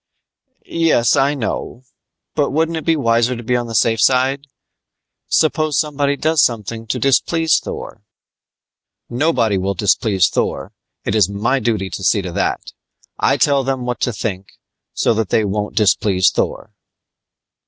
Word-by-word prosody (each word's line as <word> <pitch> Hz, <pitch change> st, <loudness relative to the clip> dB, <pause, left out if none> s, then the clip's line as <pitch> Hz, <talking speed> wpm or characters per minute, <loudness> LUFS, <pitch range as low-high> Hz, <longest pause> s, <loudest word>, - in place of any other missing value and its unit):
"Yes, 165 Hz, -8 st, +2 dB
I 140 Hz, +2 st, +2 dB
know, 120 Hz, 0 st, -4 dB, 0.5 s
but 145 Hz, -2 st, 0 dB
wouldn't 160 Hz, +3 st, 0 dB
it 160 Hz, -, -5 dB
be 165 Hz, -, +3 dB
wiser 120 Hz, -2 st, +1 dB
to 120 Hz, -, -8 dB
be 125 Hz, +2 st, 0 dB
on 120 Hz, -1 st, -1 dB
the 115 Hz, -, -6 dB
safe 115 Hz, -1 st, +2 dB
side? 135 Hz, +2 st, +2 dB, 0.8 s
Suppose 155 Hz, -2 st, +1 dB
somebody 145 Hz, -2 st, 0 dB
does 155 Hz, -1 st, +2 dB
something 115 Hz, 0 st, -2 dB
to 125 Hz, -, -2 dB
displease 160 Hz, +5 st, +2 dB
Thor?" -, -, -8 dB, 1.1 s
"Nobody 120 Hz, -7 st, +1 dB
will 100 Hz, +1 st, -2 dB
displease 100 Hz, 0 st, +2 dB
Thor! -, -, -3 dB, 0.3 s
It -, -, -1 dB
is 105 Hz, -4 st, +3 dB
my 110 Hz, +7 st, 0 dB
duty 110 Hz, -6 st, -2 dB
to 95 Hz, -, -6 dB
see 100 Hz, +2 st, +2 dB
to 90 Hz, -, -5 dB
that! -, -, -2 dB, 0.5 s
I -, -, +2 dB
tell 140 Hz, -2 st, +2 dB
them 130 Hz, -1 st, -2 dB
what 125 Hz, -1 st, -3 dB
to 125 Hz, -, +1 dB
think, 100 Hz, -3 st, -4 dB, 0.5 s
so -, -, +2 dB
that 110 Hz, -2 st, -2 dB
they 110 Hz, -, +2 dB
won't 105 Hz, +1 st, -3 dB
displease 95 Hz, -3 st, +3 dB
Thor." -, -, -3 dB
120 Hz, 155 wpm, -18 LUFS, 105-140 Hz, 1.1 s, be